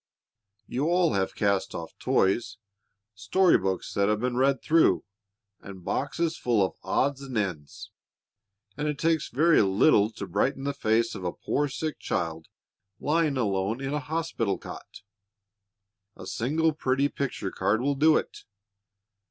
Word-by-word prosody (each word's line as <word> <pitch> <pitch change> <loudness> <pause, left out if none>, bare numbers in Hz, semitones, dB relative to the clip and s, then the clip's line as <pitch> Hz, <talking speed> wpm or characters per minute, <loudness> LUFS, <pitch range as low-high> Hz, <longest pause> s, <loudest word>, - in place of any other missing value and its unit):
You 130 +7 -2
all 175 -5 +3
have 95 -1 -1
cast 100 -2 0
off 80 -1 -6
toys, 100 +1 +1 0.6
story 170 - +3
books 95 -1 -3
that 100 +1 +2
have 105 0 +1
been 125 +1 -1
read 135 +1 +2
through, 165 0 +3 0.6
and 95 -2 -11
boxes 165 +4 -1
full 115 -5 +2
of - - -5
odds 135 +8 0
and 130 -4 -5
ends, 100 +1 -4 0.8
and 150 +2 -2
it 150 -1 -2
takes 165 0 +1
very 155 +6 +4
little 100 +2 +4
to 100 - -6
brighten 135 +9 -1
the 140 0 -1
face 115 -3 +1
of - - -7
a 90 - -1
poor 145 +10 -1
sick 155 +3 -4
child 80 -1 -3 0.5
lying 155 -2 +1
alone 100 0 0
in 135 +1 -3
a 150 - 0
hospital 150 -8 -2
cot. - - -11 1.1
A - - -9
single 155 +7 0
pretty 135 -1 +1
picture 130 -9 -4
card 100 +3 +1
will 140 +3 +1
do 155 +3 +4
it. - - -5
125 Hz, 150 wpm, -27 LUFS, 100-150 Hz, 1.1 s, very